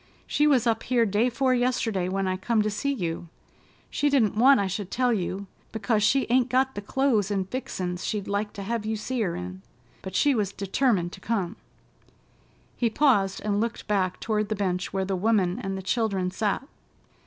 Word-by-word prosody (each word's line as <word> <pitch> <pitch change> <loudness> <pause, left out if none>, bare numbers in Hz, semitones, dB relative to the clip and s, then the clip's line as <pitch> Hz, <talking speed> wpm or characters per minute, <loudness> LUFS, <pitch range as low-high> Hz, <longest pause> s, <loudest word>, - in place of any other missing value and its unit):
She 295 - +2
was 265 -6 +4
up 225 -1 +1
here 240 -2 +2
day 215 +4 +2
'fore 255 +2 +1
yesterday, 235 -7 0
when 195 0 -1
I 185 - 0
come 215 +3 +1
to 215 - -1
see 280 +7 -1
you. 175 -9 -3 0.6
She 290 - +1
didn't 250 -8 +3
want 265 +4 +6
I 200 - +1
should 195 0 -3
tell 250 +1 +1
you, 195 0 -2 0.3
because 220 0 0
she 265 +6 +3
ain't 250 +1 +3
got 260 +1 +2
the 205 - -5
clo'es 220 -2 +1
and 195 -2 -1
fixin's 185 -7 -4
she'd 210 -2 -2
like 205 +1 -1
to 200 - -6
hev 230 +2 -2
you 220 +1 -2
see 250 +3 -3
her 180 -5 -1
in, 90 +1 -6 0.4
but 190 -1 -7
she 290 +6 +4
was 205 -5 -1
determined 195 -3 0
to 190 - -11
come——" 200 -3 -1 1.2
He 235 - +1
paused 215 -7 +2
and 205 0 +1
looked 230 0 -3
back 190 -3 0
toward 215 -2 -1
the 215 - 0
bench 185 -2 -1
where 190 0 -1
the 195 0 -1
woman 195 0 +1
and 195 -5 -3
the 190 - -6
children 195 -4 0
sat. 210 +7 -1
210 Hz, 200 wpm, -26 LUFS, 190-240 Hz, 1.2 s, want